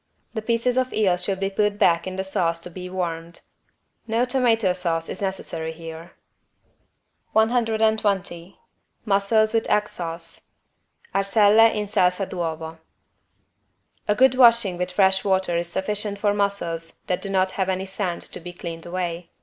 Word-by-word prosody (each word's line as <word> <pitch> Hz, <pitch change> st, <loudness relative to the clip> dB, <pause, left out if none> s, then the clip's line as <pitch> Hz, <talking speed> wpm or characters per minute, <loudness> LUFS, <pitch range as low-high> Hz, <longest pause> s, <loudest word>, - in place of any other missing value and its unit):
The 220 Hz, -, -3 dB
pieces 235 Hz, +3 st, 0 dB
of 255 Hz, 0 st, +1 dB
eel 195 Hz, -5 st, +3 dB
should 190 Hz, +2 st, -3 dB
be 195 Hz, 0 st, -1 dB
put 205 Hz, +1 st, 0 dB
back 170 Hz, -2 st, +3 dB
in 185 Hz, -, -4 dB
the 190 Hz, -, -2 dB
sauce 170 Hz, -3 st, -1 dB
to 175 Hz, -, -9 dB
be 180 Hz, +1 st, -7 dB
warmed. 170 Hz, -2 st, -4 dB, 0.7 s
No 230 Hz, +2 st, +1 dB
tomato 235 Hz, -7 st, +2 dB
sauce 170 Hz, -3 st, -2 dB
is -, -, -7 dB
necessary 170 Hz, -4 st, -3 dB
here. 165 Hz, 0 st, -10 dB, 1.2 s
120 220 Hz, -6 st, +1 dB, 0.5 s
MUSSELS 215 Hz, +2 st, +2 dB
WITH 225 Hz, -, 0 dB
EGG 210 Hz, 0 st, +2 dB
SAUCE 165 Hz, -2 st, -7 dB, 0.6 s
(Arselle 210 Hz, +3 st, +5 dB
in 210 Hz, 0 st, -1 dB
salsa 185 Hz, -1 st, +1 dB
d'uovo) 160 Hz, -2 st, -4 dB, 1.3 s
A 210 Hz, -, +2 dB
good 260 Hz, +3 st, +5 dB
washing 235 Hz, -7 st, +5 dB
with 180 Hz, 0 st, -2 dB
fresh 190 Hz, 0 st, +3 dB
water 190 Hz, -3 st, +1 dB
is 170 Hz, 0 st, -1 dB
sufficient 205 Hz, +2 st, -2 dB
for 205 Hz, 0 st, +1 dB
mussels 185 Hz, -5 st, -3 dB
that 180 Hz, -, -1 dB
do 200 Hz, -, -3 dB
not 190 Hz, -1 st, +1 dB
have 190 Hz, -1 st, -1 dB
any 190 Hz, 0 st, -1 dB
sand 190 Hz, -2 st, -3 dB
to -, -, -7 dB
be 175 Hz, +1 st, -9 dB
cleaned 170 Hz, -2 st, -7 dB
away. 175 Hz, -1 st, -4 dB
190 Hz, 150 wpm, -23 LUFS, 175-210 Hz, 1.3 s, Arselle